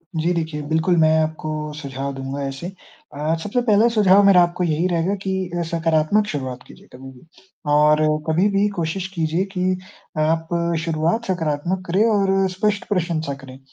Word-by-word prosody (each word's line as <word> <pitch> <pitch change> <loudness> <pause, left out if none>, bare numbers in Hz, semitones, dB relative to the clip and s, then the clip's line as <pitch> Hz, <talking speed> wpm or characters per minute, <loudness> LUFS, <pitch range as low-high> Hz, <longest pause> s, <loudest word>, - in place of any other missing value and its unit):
जी 160 +2 0
देखिए, 160 -3 -3
बिल्कुल 160 +3 +2
मैं 160 -1 +4
आपको 155 0 -3 0.3
सुझाव 140 -2 -5
दूँगा 135 +1 -5
ऐसे। 135 +5 -6 0.5
अ, 150 +3 -1
सबसे 225 +4 -1
पहला 220 -1 +4
सुझाव 200 -1 +5
मेरा 195 -2 +7
आपको 175 +1 -2
यही 165 +1 +1
रहेगा 175 +2 0
कि 190 - -1 0.2
अ, - - 0
सकारात्मक 165 +5 +2
शुरुआत 130 -7 -5
कीजिए - - -16
कभी 130 +1 -10
भी, 130 +4 -18 0.5
और 150 +1 +4 0.3
कभी 165 +5 +3
भी 200 +1 +2
कोशिश 175 +3 -2
कीजिए 165 +2 0
कि 185 0 0 0.4
आप 160 +1 +1 0.4
शुरुआत 165 +8 0
सकारात्मक 175 0 -2
करें 185 +5 +2
और 195 -2 +2
स्पष्ट 205 +2 -1
प्रशंसा 165 -6 -1
करें। 130 0 -11
165 Hz, 160 wpm, -21 LUFS, 155-190 Hz, 0.5 s, मेरा